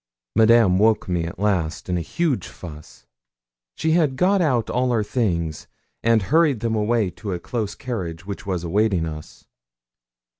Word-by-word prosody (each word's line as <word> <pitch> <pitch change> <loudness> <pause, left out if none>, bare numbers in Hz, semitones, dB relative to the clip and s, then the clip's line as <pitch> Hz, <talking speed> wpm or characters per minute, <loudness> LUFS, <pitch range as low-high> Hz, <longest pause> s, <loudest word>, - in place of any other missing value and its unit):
Madame 110 -4 +5
awoke 110 +1 +3
me 90 -2 -1
at 85 - -7
last, 90 -5 -1
in 90 - -1
a 85 - -1
huge 145 - -1
fuss. 75 -4 -12 0.7
She 160 - 0
had 155 -5 +2
got 190 +6 +3
out 125 -9 +1
all 125 0 0
our 115 -3 +1
things 85 - -2 0.3
and 115 -2 +3
hurried 150 - +2
them 115 -1 -1
away 110 -2 +1
to 100 -1 -6
a 90 - -3
close 110 +2 -4
carriage 90 -9 -5
which 100 +3 -6
was 95 -5 -3
awaiting 95 -1 +1
us. 75 -1 -9
105 Hz, 160 wpm, -22 LUFS, 90-120 Hz, 0.7 s, Madame